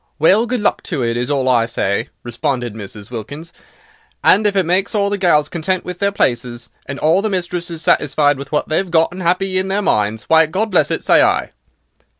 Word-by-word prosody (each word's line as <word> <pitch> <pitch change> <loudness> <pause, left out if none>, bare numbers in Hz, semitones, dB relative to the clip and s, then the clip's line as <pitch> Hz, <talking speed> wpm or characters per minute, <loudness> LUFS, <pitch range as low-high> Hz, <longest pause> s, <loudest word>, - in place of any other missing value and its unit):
"Well, 200 +9 +3
good 245 -1 -2
luck 205 - 0
to 145 -8 -2
it, 115 0 -1
is 120 +2 -2
all 135 -3 0
I 120 -3 +3
say," 100 -3 -2
responded 120 0 -3
Mrs. 105 0 -10
Wilkins, 145 +9 -8 0.7
"and 210 +2 +5
if 200 - -1
it 190 -3 +2
makes 190 +5 0
all 200 -1 +1
the 205 - 0
gals 150 -5 +3
contented 175 +3 -2
with 180 -1 -6
their 200 0 +1
places, 120 -8 -2 0.2
and 140 - -5
all 160 +6 +2
the 215 - -1
mistresses 175 -3 -4
satisfied 145 -1 +2
with 140 0 -9
what 150 - -1
they've 180 +4 -1
got 165 -1 +2
and 180 +2 -8
'appy 185 +2 0
in 190 - -2
their 200 +2 -1
minds, 105 - 0
why, 160 0 +4
God 200 +7 -2
bless 165 -6 +3
it, - - -2
say - - +4
I." - - +1
160 Hz, 210 wpm, -17 LUFS, 125-190 Hz, 0.7 s, and